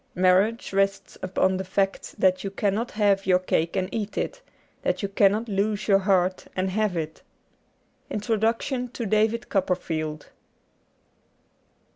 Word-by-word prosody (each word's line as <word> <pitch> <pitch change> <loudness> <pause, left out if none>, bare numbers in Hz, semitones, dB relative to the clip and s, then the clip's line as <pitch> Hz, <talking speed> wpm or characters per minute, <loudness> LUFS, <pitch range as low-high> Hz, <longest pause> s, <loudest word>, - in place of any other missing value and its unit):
Marriage 190 +6 +2
rests 195 0 0
upon 185 0 +1
the 190 - -3
fact 195 +1 -1
that 185 -1 +3
you 195 - -2
cannot 205 +4 -1
have 200 -2 +1
your 180 -1 +5
cake 170 -2 -1
and 185 -1 0
eat 210 -2 -4
it; - - -3 0.4
that - - -1
you - - +1
cannot 200 +3 +2
lose 205 0 -1
your 195 -1 +5
heart 185 -2 +1
and 185 0 -1
have 210 -2 0
it. 160 -1 -4 0.9
Introduction 225 +4 0
to 235 - -4
^ - - -2
David 220 +3 +1
Copperfield. 160 -5 -2
195 Hz, 140 wpm, -25 LUFS, 185-215 Hz, 0.9 s, your